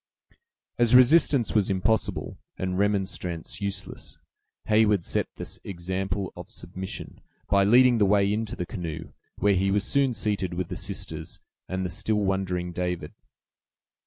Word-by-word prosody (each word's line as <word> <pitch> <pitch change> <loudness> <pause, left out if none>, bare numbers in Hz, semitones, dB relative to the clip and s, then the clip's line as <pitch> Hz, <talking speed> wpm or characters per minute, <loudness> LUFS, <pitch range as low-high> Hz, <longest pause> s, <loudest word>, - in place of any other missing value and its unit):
As 120 0 +5
resistance 130 -1 +5
was 105 -3 +2
impossible, 100 +4 0 0.2
and 95 0 -2
remonstrance 95 -3 -1
useless, 100 -2 -5 0.5
Heyward 105 -4 +3
set - - 0
the - - -6
example 95 +1 -3
of - - -9
submission, 95 +2 -7 0.3
by 100 0 +4
leading 120 +2 +6
the 100 - +4
way 100 0 +3
into 110 -1 -2
the 90 - -3
canoe, 80 -3 -6 0.2
where 100 0 +3
he 95 +1 +1
was 100 0 +1
soon 135 +2 +2
seated 100 -4 -1
with 90 -1 -3
the - - -4
sisters 80 +1 -5 0.3
and 95 0 -2
the - - -2
still 105 +2 0
wondering 95 -2 -1
David. 90 0 -3
95 Hz, 140 wpm, -26 LUFS, 90-105 Hz, 0.5 s, leading